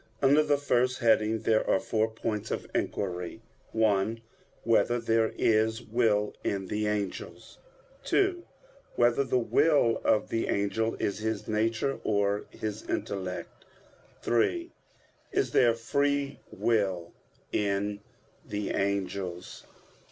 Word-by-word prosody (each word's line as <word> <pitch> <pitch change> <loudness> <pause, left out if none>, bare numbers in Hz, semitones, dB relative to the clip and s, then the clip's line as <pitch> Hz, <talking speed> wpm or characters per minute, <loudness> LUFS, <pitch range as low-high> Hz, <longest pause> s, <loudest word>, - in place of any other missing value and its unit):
Under 140 +2 +5
the 145 -1 +2
first 130 -2 +1
heading 110 -1 +2
there 110 -1 +2
are - - +4
four 110 +2 0
points 110 -1 -3
of - - -3
inquiry: 90 +3 -3 0.3
(1) 110 0 +1 0.4
Whether 120 +1 +3
there 115 -1 +2
is 110 +1 +2
will 110 -3 +1
in 95 -2 -2
the 105 0 -1
angels? 105 -2 -4 0.5
(2) 385 -3 +2 0.5
Whether 120 +3 +3
the 130 - +1
will 125 -1 +3
of 105 - +2
the 115 - -1
angel 110 +3 0
is 100 - -2
his 110 -1 -3
nature, 110 +5 0
or 100 -1 +1
his 110 0 -5
intellect? 95 -3 -4 0.6
(3) 340 - +1 0.6
Is 400 +1 0
there 120 -2 +4
free 140 +4 0
will 95 -7 0 0.4
in 100 0 0 0.4
the 105 0 -3
angels? 95 -2 -3
110 Hz, 115 wpm, -29 LUFS, 100-120 Hz, 0.6 s, Under